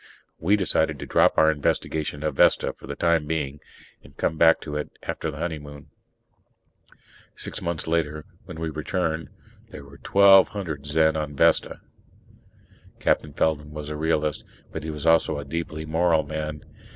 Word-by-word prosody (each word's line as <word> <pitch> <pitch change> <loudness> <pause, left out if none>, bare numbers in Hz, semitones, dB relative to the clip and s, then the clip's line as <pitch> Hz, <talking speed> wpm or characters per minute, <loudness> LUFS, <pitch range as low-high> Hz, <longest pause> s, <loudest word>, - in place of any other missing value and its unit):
We 95 +6 +3
decided 80 -6 +1
to - - -7
drop - - +3
our 80 0 +6
investigation 75 0 -2
of 75 -1 -1
Vesta - - +3
for - - -14
the - - -5
time 85 -3 +1
being, 75 -3 -3 0.4
and - - -18
come 80 - 0
back 80 +1 +5
to 75 - -6
it 75 - -3
after - - -3
the 75 - -7
honeymoon. 75 -3 -6 1.4
Six - - -6
months 85 -2 -3
later, 75 -2 -1 0.2
when 80 - -9
we 80 -1 -3
returned, 80 +1 -2 0.4
there 70 - -10
were 70 0 -15
twelve 100 -1 +6
hundred 80 -9 -6
Zen 80 +1 +3
on 75 -2 -3
Vesta! - - +2 1.2
Captain 75 - +1
Feldman 75 -1 0
was 75 -1 -6
a 75 - -4
realist 75 -1 -1 0.3
but 80 - -6
he 80 - -5
was 75 -1 -6
also 80 -2 +3
a 70 - -6
deeply 80 +1 -4
moral 80 0 +2
man. 75 0 -5
80 Hz, 165 wpm, -24 LUFS, 75-80 Hz, 1.4 s, our